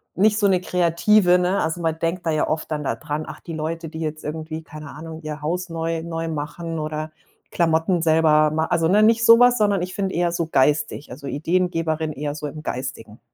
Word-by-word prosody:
nicht 210 Hz, +2 st, +3 dB
so 205 Hz, -, +3 dB
'ne 185 Hz, -2 st, +2 dB
Kreative, 180 Hz, +2 st, +3 dB
ne? 180 Hz, +2 st, +1 dB
Also, 160 Hz, +2 st, -2 dB
man 160 Hz, -1 st, -1 dB
denkt 170 Hz, +2 st, -2 dB
da 160 Hz, -, +2 dB
ja 155 Hz, -, +1 dB
oft 155 Hz, 0 st, -2 dB
dann 150 Hz, -1 st, -2 dB
da 135 Hz, -, 0 dB
dran: 150 Hz, +6 st, -4 dB
„Ach, -, -, -8 dB
die 165 Hz, -, -8 dB
Leute, 160 Hz, +1 st, -4 dB
die 160 Hz, +1 st, -8 dB
jetzt 155 Hz, -1 st, -4 dB
irgendwie, 155 Hz, +1 st, -5 dB
keine 155 Hz, -2 st, -10 dB
Ahnung, 160 Hz, +1 st, -9 dB
ihr 150 Hz, -1 st, -6 dB
Haus 180 Hz, +4 st, -2 dB
neu 165 Hz, 0 st, -3 dB
neu 165 Hz, -1 st, -4 dB
machen 160 Hz, +2 st, -4 dB
oder 155 Hz, 0 st, -4 dB, 0.4 s
Klamotten 165 Hz, +1 st, +1 dB
selber 155 Hz, -1 st, +4 dB
ma“ 160 Hz, +1 st, 0 dB
also, 165 Hz, -1 st, +1 dB
ne, 205 Hz, +4 st, +4 dB
nicht 225 Hz, +1 st, +4 dB
so 230 Hz, 0 st, +8 dB
was, 245 Hz, 0 st, +5 dB
sondern 205 Hz, -4 st, +2 dB
ich 180 Hz, +1 st, -5 dB
finde 195 Hz, -2 st, -2 dB
eher 175 Hz, 0 st, +1 dB
so 170 Hz, -1 st, -1 dB
geistig, 145 Hz, 0 st, +1 dB
also, 140 Hz, +3 st, -9 dB
Ideengeberin 165 Hz, 0 st, -1 dB
eher 145 Hz, +1 st, -4 dB
so 150 Hz, -, -6 dB
im 155 Hz, +2 st, -8 dB
Geistigen. 125 Hz, -6 st, -6 dB
160 Hz, 215 wpm, -22 LUFS, 155-180 Hz, 0.4 s, so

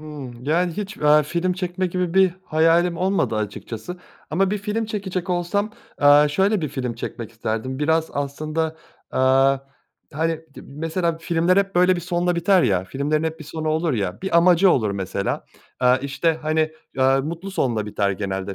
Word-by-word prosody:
Hımm. 135 Hz, -6 st, -9 dB
Yani, 170 Hz, +4 st, +1 dB
hiç, 205 Hz, +2 st, -6 dB
aaa, 150 Hz, 0 st, +5 dB
film 170 Hz, +5 st, -1 dB
çekmek 180 Hz, 0 st, -3 dB
gibi 180 Hz, -2 st, -1 dB
bir 190 Hz, -2 st, +5 dB
hayalim 165 Hz, +2 st, +3 dB
olmadı 185 Hz, -, 0 dB
açıkçası 110 Hz, -, -5 dB, 0.3 s
ama 190 Hz, +5 st, +1 dB
bir 210 Hz, -, -1 dB
film 210 Hz, +2 st, -2 dB
çekecek 190 Hz, -4 st, -4 dB
olsam, 180 Hz, +4 st, 0 dB, 0.3 s
aaa, 145 Hz, +1 st, +6 dB
şöyle 195 Hz, +6 st, +1 dB
bir 155 Hz, -, -2 dB
film 130 Hz, -3 st, -4 dB
çekmek 115 Hz, -1 st, -6 dB
isterdim. 115 Hz, +3 st, -3 dB
Biraz 160 Hz, +2 st, +1 dB
aslında, 155 Hz, +3 st, -2 dB, 0.3 s
aaa, 135 Hz, +1 st, +4 dB, 0.6 s
hani, 160 Hz, +2 st, -1 dB
di -, -, -10 dB
mesela 165 Hz, +3 st, -2 dB
filmler 170 Hz, +2 st, +1 dB
hep, 195 Hz, -1 st, +1 dB
böyle, 180 Hz, +1 st, +4 dB
bir -, -, -3 dB
sonla 175 Hz, 0 st, 0 dB
biter 180 Hz, +2 st, +4 dB
ya, 95 Hz, -2 st, +1 dB
filmlerin 145 Hz, +8 st, -1 dB
hep 160 Hz, 0 st, -3 dB
bir 155 Hz, -, -9 dB
sonu 155 Hz, +1 st, -4 dB
olur 160 Hz, +1 st, +1 dB
ya. 100 Hz, -6 st, -2 dB
Bir 190 Hz, -3 st, +1 dB
amacı 180 Hz, +2 st, +5 dB
olur 110 Hz, -10 st, +2 dB
mesela, 100 Hz, 0 st, -3 dB, 0.4 s
aaa, 125 Hz, 0 st, +5 dB
işte, 140 Hz, +4 st, -1 dB
hani, 155 Hz, 0 st, +1 dB, 0.3 s
aaa, 135 Hz, +1 st, +4 dB
mutlu 170 Hz, +7 st, -5 dB
sonla 115 Hz, -, -1 dB
biter 100 Hz, -1 st, 0 dB
genelde 95 Hz, 0 st, -3 dB
160 Hz, 170 wpm, -22 LUFS, 135-180 Hz, 0.6 s, aaa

